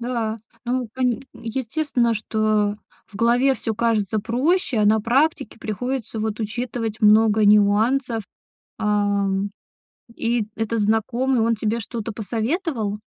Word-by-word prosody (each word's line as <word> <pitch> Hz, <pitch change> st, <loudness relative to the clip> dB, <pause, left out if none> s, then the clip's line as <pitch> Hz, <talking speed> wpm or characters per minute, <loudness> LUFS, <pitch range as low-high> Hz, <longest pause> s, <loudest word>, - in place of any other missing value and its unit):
да. 235 Hz, -2 st, -2 dB, 0.3 s
Ну, 250 Hz, 0 st, -1 dB
кань 250 Hz, -2 st, 0 dB
естественно, 240 Hz, +1 st, -1 dB
что 215 Hz, -1 st, 0 dB, 0.3 s
в -, -, -24 dB
голове 240 Hz, +5 st, +3 dB
всё 225 Hz, -, -3 dB
кажется 220 Hz, -2 st, +1 dB
проще, 255 Hz, -, 0 dB
а 210 Hz, -, +3 dB
на 215 Hz, +1 st, +4 dB
практике 255 Hz, +2 st, +1 dB
приходится 230 Hz, +1 st, -3 dB
вот 215 Hz, 0 st, -2 dB
учитывать 225 Hz, 0 st, -3 dB
много 215 Hz, 0 st, +5 dB
нюансов. 215 Hz, +3 st, +3 dB, 0.5 s
А, 205 Hz, -1 st, +1 dB, 0.9 s
и 230 Hz, -2 st, 0 dB
этот 225 Hz, 0 st, -1 dB
знакомый, 235 Hz, +4 st, +1 dB
он 230 Hz, +1 st, +2 dB
тебе 220 Hz, +2 st, -1 dB
что-то 225 Hz, 0 st, -5 dB
посоветовал? 225 Hz, -, -2 dB
225 Hz, 120 wpm, -22 LUFS, 215-245 Hz, 0.9 s, много